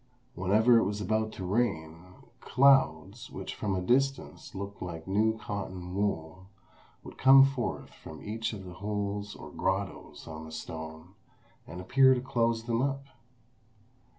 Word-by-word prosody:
Whenever 110 +6 +4
it - - +2
was 100 +2 -2
about 110 +2 0
to 95 - -7
rain, 90 -6 -1 0.4
clouds, 120 - +3
which 95 0 -6
from 100 -3 -2
a 90 - -1
distance 135 +5 0
looked 100 +1 -6
like 85 -2 -6
new 110 +3 +2
cotton 95 -4 -6
wool, 95 -2 -2 0.6
would - - -12
come 135 0 +8
forth 135 -3 -3
from 80 - -11
each 110 +2 -3
of 100 -4 -8
the 90 - -9
holes 105 +1 -3
or - - -10
grottoes 95 0 -3
on 80 -1 -7
the 80 - -10
stone, 80 +2 -8 0.5
and 90 - -8
appear 130 +7 +5
to - - -1
close 115 -3 0
them 115 0 0
up. 135 0 -1
100 Hz, 150 wpm, -29 LUFS, 90-115 Hz, 0.6 s, come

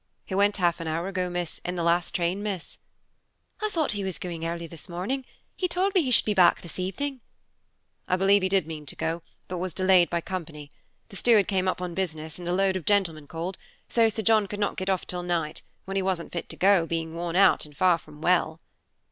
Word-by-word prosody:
"He - - -7
went 200 +2 +3
half 175 -2 +2
an 165 - -5
hour 165 +3 -1
ago, 185 -2 -1 0.4
in 180 - -3
the 175 - -1
last 170 0 +1
train, 180 +2 0
miss." 200 -5 -4 0.8
"I 430 - 0
thought 320 -7 0
he 205 -1 -1
was 190 -2 -2
going 170 -3 -5
early 170 0 -3
this 165 0 -8
morning; 215 +10 -3 0.3
he 365 - 0
told 370 +3 0
me 375 - +5
he 270 - -1
should 250 - +4
be 210 - +1
back 185 -3 +5
this 170 +1 -8
evening." 260 +9 -3 0.9
"I 185 - +2
believe 195 +2 +4
he 190 - +1
did 190 -4 +2
mean 155 -2 -7
to - - -4
go, 165 +1 -2 0.3
but 180 -1 -4
was 185 0 -4
delayed 185 -2 +5
by 170 - 0
company. 160 -5 -6 0.4
The 195 - -8
steward 220 -3 +5
came 190 -2 0
up 180 0 -1
on 175 -1 -4
business, 160 -3 -3
and 175 - -7
a - - 0
load 190 0 +2
of 180 -5 -4
gentlemen 170 -7 +1
called, 170 +4 -5 0.3
so 230 -1 +4
Sir 220 0 -2
John 215 -1 +4
could 205 +1 -6
not 205 - 0
get 185 +1 -3
off 190 -2 0
till 180 -1 -4
night, 170 -3 -2 0.2
when 195 0 -5
he - - +2
wasn't 185 -3 -2
fit 170 - -4
to - - -6
go, 190 -3 +4
being 165 -1 -3
worn 170 0 -3
out, 195 0 +5
and 150 - -18
far 180 -2 +4
from 150 -1 -15
well." 170 -2 +2
185 Hz, 230 wpm, -26 LUFS, 170-195 Hz, 0.9 s, me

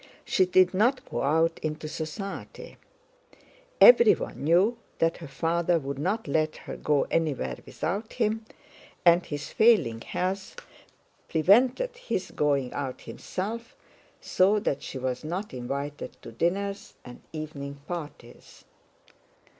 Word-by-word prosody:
She 185 - +2
did 185 0 +4
not 240 +7 +2
go - - -3
out 160 +4 +2
into 155 0 -4
society; 160 +6 -7 1.0
everyone 470 - +6
knew 185 +10 +3 0.2
that 165 0 +1
her - - -9
father 170 +4 +1
would 140 -2 -5
not 200 +7 -1
let 155 +2 0
her - - -6
go 150 -2 +1
anywhere 140 - 0
without 205 +6 -3
him, 220 -1 0 0.6
and 170 +1 +6
his 145 -1 -6
failing 210 - +3
health 190 +6 -3 0.7
prevented 245 - +3
his - - -4
going 140 -4 0
out 135 -3 -4
himself, 225 - -6 0.4
so 195 +3 +3
that 200 -9 -1
she - - -6
was 130 0 -3
not 180 +7 -4
invited 140 +3 -5
to - - -9
dinners 195 - -2
and 125 -1 -11
evening 140 -3 -6
parties. 150 -8 -9
165 Hz, 120 wpm, -27 LUFS, 145-200 Hz, 1.0 s, everyone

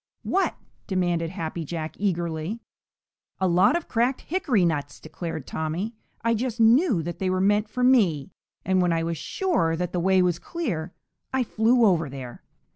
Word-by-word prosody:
"What?" 390 - +1 0.3
demanded 175 -4 0
Happy 165 -2 -4
Jack 160 0 -5
eagerly. 170 +1 -2 0.8
"A 190 - +2
lot 180 - +4
of 345 - -2
cracked 245 +3 +1
hickory 280 - +1
nuts!" 145 -7 -2
declared 165 -5 -6
Tommy. 165 +8 -3 0.3
"I 230 0 +2
just 235 +1 -2
knew 230 - +4
that 170 +1 -5
they 190 - 0
were 185 0 0
meant 205 +2 +2
for 250 +3 -2
me, 195 - +3 0.3
and 190 -1 +2
when 175 -1 +2
I 165 0 0
was 165 0 -2
sure 255 - 0
that 175 +1 -3
the 180 - 0
way 190 +1 +3
was 175 -1 +1
clear, 180 - -4 0.4
I 265 -1 +1
flew 230 +1 +3
over 165 -7 +2
there. 130 -3 -8
185 Hz, 170 wpm, -25 LUFS, 165-230 Hz, 0.8 s, lot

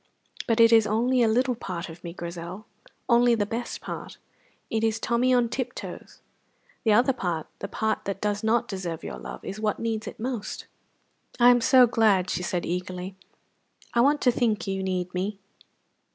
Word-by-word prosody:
But 230 -1 +1
it 230 0 +7
is 225 -2 +6
only 245 +4 +2
a 230 - +4
little 250 +3 +2
part 185 -6 -5
of 165 0 -12
me, 170 - -5
Grizel; 170 +3 -7 0.4
only 240 -1 +5
the 210 -2 0
best 235 +3 -5
part. - - -7 0.5
It 225 0 0
is 225 -1 +1
Tommy 235 +2 +1
on 245 -2 +4
tiptoes. 245 +2 -6 0.6
The 220 - +3
other 245 +5 +4
part, 175 -9 -3
the - - -4
part 220 +2 -2
that 195 0 -3
does 205 0 -1
not 235 +2 +2
deserve 180 -6 -5
your - - -6
love, - - -9
is 195 - -5
what 215 -1 0
needs 225 -1 -3
it - - -8
most." 235 -2 -4 0.7
"I 245 +1 +8
am 245 -1 +3
so 255 +1 +7
glad!" 215 -6 +2
she - - -2
said 180 0 -2
eagerly. 180 +1 -4 0.8
"I 235 - +4
want 290 +4 +3
to 250 - +4
think 225 -3 0
you 195 -1 -2
need 185 -1 -2
me." 195 +3 -2
220 Hz, 180 wpm, -26 LUFS, 185-240 Hz, 0.8 s, I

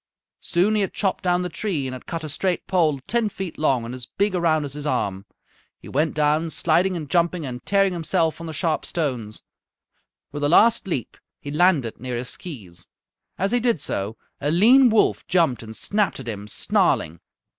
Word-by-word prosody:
Soon 185 +5 +1
he 215 - +2
had 195 - -2
chopped 195 -3 -1
down 180 0 +2
the - - -1
tree 180 -7 -2
and 130 - -4
had 130 - -9
cut 165 -1 -4
a 155 - -5
straight 180 +4 -1
pole 160 -7 +2
ten 235 -2 0
feet 190 -4 -6
long 130 -6 +2
and 120 - -6
as 125 -2 -6
big 200 0 0
around 160 -4 +2
as 140 - -6
his 150 0 -5
arm. 100 -7 -1 0.5
He - - -14
went 150 +4 0
down, 155 +2 +2
sliding 175 +4 +1
and 155 -4 -5
jumping 170 +1 +1
and 125 -2 -6
tearing 195 -1 +3
himself 165 -1 0
on 165 - -6
the - - -5
sharp 160 +1 -1
stones. 125 -10 -3 0.9
With 145 0 -5
a 145 - +2
last 225 +5 +5
leap 135 -10 -3 0.2
he 145 - -7
landed 150 -7 +2
near 125 +1 -4
his 125 +1 -4
skees. 100 - -6 0.5
As 195 +3 0
he 245 - +3
did 235 -7 +1
so 105 -2 -3 0.2
a 145 - -1
lean 240 - +6
wolf 220 -1 +2
jumped 170 -8 +2
and 110 -1 -8
snapped 205 -6 0
at 130 - -9
him, 105 -2 -5
snarling. 85 -5 +1
160 Hz, 200 wpm, -23 LUFS, 130-185 Hz, 0.9 s, lean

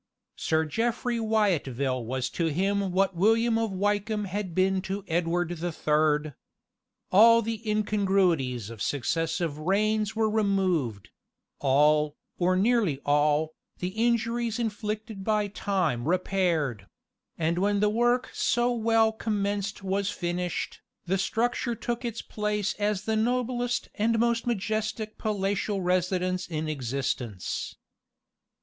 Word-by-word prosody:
Sir 160 0 +1
Jeffry 235 +7 -1
Wyatville 145 - 0
was 125 +1 -2
to 170 - 0
him 195 +4 0
what 190 +1 +1
William 225 +5 +3
of 225 -1 0
Wykeham 205 +2 0
had 190 -2 -4
been 190 0 +2
to 195 +1 -4
Edward 170 +1 0
the 175 +2 -3
Third. 150 -1 +1 0.8
All 230 +4 +7
the 225 0 -3
incongruities 190 - +1
of 115 -3 -10
successive 160 +3 -1
reigns 215 +5 +1
were 220 0 +2
removed: 190 - 0 0.5
all, 150 +2 +3 0.2
or 180 +1 +3
nearly 200 - +2
all, 150 +2 +2 0.2
the 180 - -3
injuries 230 +2 0
inflicted 215 -2 -4
by 210 0 +1
time 180 - -1
repaired; 170 - 0 0.5
and 165 +2 0
when 205 +1 +2
the 210 - +3
work 240 +3 +1
so 240 +1 +1
well 225 -1 +3
commenced 205 -2 -2
was 195 +1 0
finished, 175 0 -3 0.2
the 190 +2 0
structure 235 +4 0
took 240 +2 -3
its 235 -2 -4
place 210 -1 -1
as 205 -2 0
the 220 - 0
noblest 245 +1 0
and 225 +2 +1
most 235 +1 +1
majestic 215 0 -2
palatial 200 -1 -1
residence 185 0 0
in 155 -2 -3
existence. 130 -7 -3
195 Hz, 120 wpm, -27 LUFS, 165-220 Hz, 0.8 s, All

